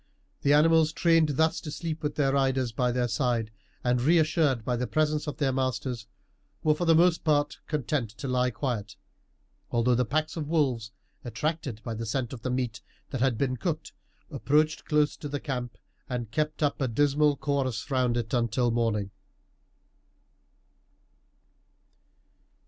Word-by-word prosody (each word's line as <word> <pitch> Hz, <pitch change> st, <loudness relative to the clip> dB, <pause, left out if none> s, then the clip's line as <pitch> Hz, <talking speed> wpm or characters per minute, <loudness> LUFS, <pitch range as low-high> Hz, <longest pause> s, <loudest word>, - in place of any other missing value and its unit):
The 145 Hz, -, +3 dB
animals, 160 Hz, +1 st, +4 dB
trained 165 Hz, -3 st, +3 dB
thus 160 Hz, 0 st, +2 dB
to 155 Hz, -, -7 dB
sleep 160 Hz, +1 st, -4 dB
with 150 Hz, -1 st, -2 dB
their 135 Hz, -2 st, +2 dB
riders 135 Hz, -3 st, +1 dB
by 125 Hz, +2 st, 0 dB
their 125 Hz, 0 st, 0 dB
side, 115 Hz, -1 st, 0 dB, 0.3 s
and 125 Hz, 0 st, +2 dB
reassured 155 Hz, -5 st, +2 dB
by 125 Hz, -, 0 dB
the 125 Hz, +1 st, -2 dB
presence 155 Hz, -1 st, 0 dB
of 150 Hz, -, -4 dB
their 140 Hz, -3 st, +1 dB
masters, 130 Hz, -3 st, -2 dB, 0.6 s
were 155 Hz, -, +4 dB
for 175 Hz, +3 st, -2 dB
the 165 Hz, -1 st, +5 dB
most 170 Hz, +1 st, +4 dB
part 150 Hz, -2 st, +1 dB
content 145 Hz, -5 st, -1 dB
to 115 Hz, +6 st, -7 dB
lie 125 Hz, 0 st, +2 dB
quiet, 115 Hz, -3 st, -3 dB, 0.7 s
although 120 Hz, +1 st, +2 dB
the 125 Hz, +1 st, +3 dB
packs 155 Hz, +5 st, -1 dB
of 155 Hz, -3 st, -4 dB
wolves, 130 Hz, -8 st, 0 dB, 0.3 s
attracted 130 Hz, -1 st, -3 dB
by 115 Hz, -, -4 dB
the 115 Hz, +1 st, -5 dB
scent 125 Hz, +2 st, -2 dB
of 120 Hz, -, -8 dB
the 130 Hz, -, -3 dB
meat 125 Hz, -2 st, -2 dB, 0.3 s
that 130 Hz, -, -3 dB
had 130 Hz, -3 st, +2 dB
been 130 Hz, +1 st, 0 dB
cooked, -, -, -3 dB, 0.4 s
approached 155 Hz, +3 st, +1 dB
close 150 Hz, -1 st, +2 dB
to 145 Hz, -, -6 dB
the 145 Hz, 0 st, -3 dB
camp 125 Hz, -5 st, -4 dB, 0.3 s
and 120 Hz, -3 st, -4 dB
kept 150 Hz, +4 st, -1 dB
up 145 Hz, 0 st, 0 dB
a 135 Hz, -, +2 dB
dismal 145 Hz, +4 st, +2 dB
chorus 140 Hz, -2 st, -2 dB
round 125 Hz, -2 st, +2 dB
it 115 Hz, -2 st, -3 dB
until 120 Hz, 0 st, +1 dB
morning. 110 Hz, -4 st, 0 dB
135 Hz, 160 wpm, -28 LUFS, 120-150 Hz, 0.7 s, the